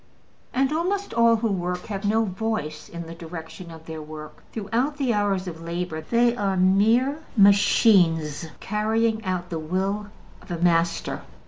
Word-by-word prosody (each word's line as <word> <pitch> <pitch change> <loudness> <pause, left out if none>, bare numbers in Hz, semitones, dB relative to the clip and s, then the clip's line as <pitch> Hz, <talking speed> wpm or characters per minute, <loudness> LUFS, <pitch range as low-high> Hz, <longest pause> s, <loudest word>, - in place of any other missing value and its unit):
And 265 +2 +1
almost 385 +5 -1
all 230 0 +5
who 225 +1 0
work 180 -2 -2
have 200 -1 -5
no 220 +2 +2
voice 190 -7 -3
in 170 0 -7
the 165 - -8
direction 165 +1 -9
of 160 -1 -12
their 160 -1 -6
work; 155 0 -10
throughout 235 +7 -1
the 265 -5 +1
hours 200 -3 0
of 165 -2 -7
labor 170 -1 -4
they 235 +7 +2
are 195 -5 -1
mere 220 +10 +3 0.2
machines 180 -6 +4
carrying 220 +2 0
out 180 -2 -3
the 165 - -2
will 190 +6 -2 0.3
of - - -18
a 175 - -3
master. 170 0 +1
195 Hz, 155 wpm, -24 LUFS, 170-225 Hz, 0.3 s, all